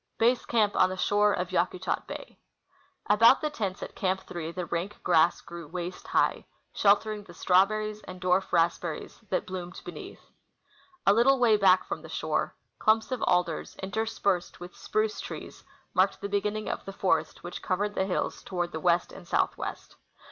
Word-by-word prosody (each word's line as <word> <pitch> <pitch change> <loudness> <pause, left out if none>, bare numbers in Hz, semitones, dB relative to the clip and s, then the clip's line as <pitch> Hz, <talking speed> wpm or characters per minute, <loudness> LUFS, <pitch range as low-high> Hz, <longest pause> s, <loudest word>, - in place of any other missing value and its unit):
Base 240 +2 +3
CIamp 215 -3 +2
on - - +4
the 185 - -5
Shore 205 +2 +3
of 180 -2 -1
Yakutat 180 +1 -1
Bav. - - -8 0.7
About 230 +5 +6
^the 305 -1 -2
tents 200 -7 -3
at - - -7
Camp 190 0 0
8 170 -1 -4
the 180 -1 -3
rank 170 +5 -3
grass 170 -1 +4
grew 170 -2 -9
waist 175 +2 -6
high, - - +1 0.3
sheltering 210 +1 +2
the 175 -3 -14
strawberries 215 +4 +2
and 185 0 -8
dwarf 185 +1 +1
raspberries 170 -1 0
that 185 - 0
l^loomed 180 -1 -7
beneath. - - -10 0.7
A 200 - +6
little 255 +5 +5
Avay 220 -2 +6
back 190 -2 +5
from - - -4
the - - -11
shore, - - -1 0.2
clumps 220 +3 +2
of 255 - -2
alders, 175 -3 0
in 190 0 -6
terspersed 200 -5 -1
with 175 0 -10
spruce 215 0 -1
trees, - - -8 0.3
marked 190 +1 +2
the 200 - -4
beginning 210 +1 -1
of - - -3
the 195 - -7
forest 160 -5 0
Avhich 175 - -6
covered 205 +2 -1
the 190 - 0
hills 185 - -2
toward 175 -2 -3
the 160 - -4
west 175 +1 +2
and - - -12
southwest. - - -2
190 Hz, 175 wpm, -28 LUFS, 175-210 Hz, 0.7 s, About